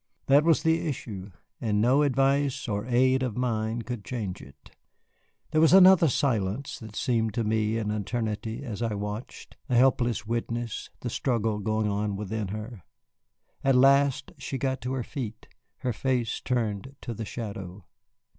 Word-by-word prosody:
That 140 +2 +5
was 165 -1 +3
the 165 +1 +2
issue, 105 -9 -5 0.3
and 105 -3 +1
no 125 +6 +4
advice 140 0 +1
or 105 +1 -2
aid 130 +1 +3
of 125 -4 -2
mine 115 -2 -1
could 120 -4 -5
change 105 -7 -4
it. 70 -1 -16 0.8
There 155 - +3
was 160 +1 +6
another 190 -3 +8
silence 120 -3 -1
that 110 -2 -10
seemed 115 -3 0
to 120 - 0
me 110 0 +1
an 105 -2 -1
eternity 110 +3 -3
as 115 -5 -5
I 115 -3 -1
watched, 105 +3 -6
a 125 - +2
helpless 120 -4 +3
witness, 115 0 -3
the 120 - -3
struggle 115 -5 0
going 110 +1 0
on 100 0 -1
within 105 +1 -3
her. 105 +1 -6 0.8
At 135 -1 +4
last 140 +1 +4
she 135 -1 -4
got 130 -1 -1
to 125 +3 -3
her 130 -2 -2
feet, 115 -5 -6 0.3
her 125 -2 -1
face 125 -1 -1
turned 120 0 -2
to 120 - -5
the 110 - -5
shadow. 100 -4 -7
115 Hz, 160 wpm, -27 LUFS, 105-130 Hz, 0.8 s, another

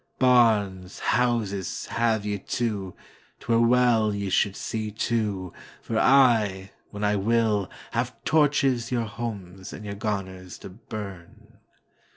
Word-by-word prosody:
Barns, 105 -7 +3
houses, 115 -7 0
have 110 -3 0
ye, 105 -1 -2
too,'T 100 -3 -6
were 115 -1 +3
well 115 -3 +3
ye 100 -1 -3
should 100 +1 +2
see 110 -1 -3
to, 105 -4 -2 0.3
For 115 -1 -2
I, 110 -8 +4 0.2
when 105 0 -6
I 105 0 +2
will, 105 -1 +1 0.2
have 120 +1 -2
torchesYour 130 -6 +2
homes 100 -5 -6
and 105 - -8
your 100 - -4
garners 95 -3 -4
to - - -8
burn. 100 -3 -10
105 Hz, 120 wpm, -25 LUFS, 100-120 Hz, 0.3 s, I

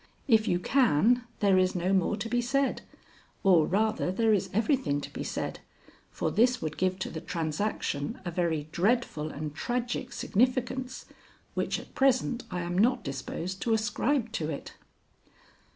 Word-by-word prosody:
If 225 -3 +4
you 175 - +2
can, 245 - +3
there 195 -2 +5
is 185 0 +2
no 180 +2 +1
more 190 +2 +2
to 220 +2 -3
be 245 +1 +1
said, 270 +3 0 0.6
or, 175 -5 +5
rather, 215 -1 +1
there 220 +3 +3
is 200 - +1
everything 220 - +1
to - - -8
be - - -4
said, - - -4 0.5
for - - -2
this 245 +3 +3
would 155 -5 -4
give 185 0 +1
to - - -3
the 160 - -5
transaction 165 - -2
a 175 - -2
very 165 -4 -1
dreadful 185 -6 0
and 150 0 -5
tragic 240 +8 -2
significance 255 +3 0 0.5
which - - -1
at - - -13
present 255 -2 +2
I 180 -1 -3
am 175 +1 -3
not 245 +2 +3
disposed 170 +6 -5
to 225 -2 +2
ascribe 235 +2 0
to 160 -7 -2
it." 145 - -6
210 Hz, 160 wpm, -29 LUFS, 175-245 Hz, 0.6 s, there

